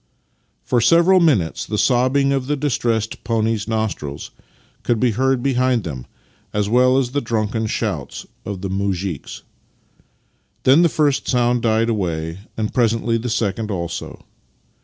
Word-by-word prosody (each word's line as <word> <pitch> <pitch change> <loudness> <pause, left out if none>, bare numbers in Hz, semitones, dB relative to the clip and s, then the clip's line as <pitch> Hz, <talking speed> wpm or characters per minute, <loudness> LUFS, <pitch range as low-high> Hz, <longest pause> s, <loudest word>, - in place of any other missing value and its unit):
" - - -44 0.2
For 120 - +1
several 170 +7 +5
minutes 125 - +2
the 105 - -2
sobbing 130 +4 +2
of 135 -2 -2
the 150 - +1
distressed 115 -5 -1
pony's 110 -2 0
nostrils 110 -11 -3 0.5
could 120 -2 0
be 125 0 +2
heard 130 +2 +1
behind 125 -3 +1
them, 65 -7 -6 0.5
as 105 -1 0
well 125 +3 +4
as 130 -2 0
the 145 +1 -1
drunken 110 -1 -1
shouts - - -3 0.2
of 100 -2 -6
the 95 - -3
muzhiks. 95 -4 -3 1.2
Then 135 +6 +6
the 170 - +4
first 145 -3 +1
sound 120 -1 +2
died 115 0 +2
away, 85 -5 -2 0.2
and 110 -1 -2
presently 115 -1 +1
the 120 +2 -4
second 110 -1 -1
also. 85 -4 -5
115 Hz, 145 wpm, -20 LUFS, 105-130 Hz, 1.2 s, Then